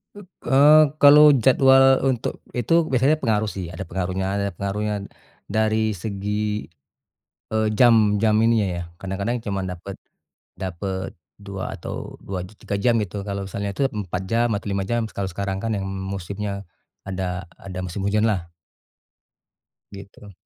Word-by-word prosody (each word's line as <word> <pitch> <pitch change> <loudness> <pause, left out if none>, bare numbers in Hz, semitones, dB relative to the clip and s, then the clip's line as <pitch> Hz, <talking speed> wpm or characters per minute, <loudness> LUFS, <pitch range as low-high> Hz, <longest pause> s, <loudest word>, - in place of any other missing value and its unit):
Up 205 -2 -12 0.2
eee, 150 +3 +7 0.2
kalau 150 +1 +8
jadwal 135 0 +5
untuk 130 -4 -1
itu 165 +7 +2
biasanya 135 +4 +3
pengaruh, 110 -7 0
sih, 95 -4 -5
ada 85 - -7
pengaruhnya 95 +1 -2
ada 100 0 0
pengaruhnya 100 +2 -3 0.4
dari 110 0 +1
segi, 105 +2 -3 0.8
e 110 - -3 0.2
jam 110 -3 +4
jam 110 -1 +3
ininya, 115 -3 +3
ya, 85 - -4 0.2
kadang-kadang 100 +5 -2
cuman 100 -3 -3
dapat 95 +2 -8 0.6
dapat 95 +1 -5 0.2
2 100 -2 -6
atau - - -7
2 95 -2 -5
j - - -17
tiga 100 - -3
jam, 115 +4 +2
gitu. 100 0 -4
Kalau 100 0 -3
misalnya 100 +1 -3
itu, 140 - +1
4 95 -6 -4
jam 115 +2 +2
atau 100 - -7
5 100 0 -1
jam, 120 -1 +1
kalau 100 -3 -4
sekarang, 100 +1 -3
kan, 115 - -1
yang 95 -1 -3
musimnya 100 +1 -5 0.4
ada 95 -1 -3
ada 95 -1 -8
musim 90 +2 -5
hujanlah. 100 -5 0 1.4
Gitu. 100 +1 -12
100 Hz, 145 wpm, -23 LUFS, 95-115 Hz, 1.4 s, kalau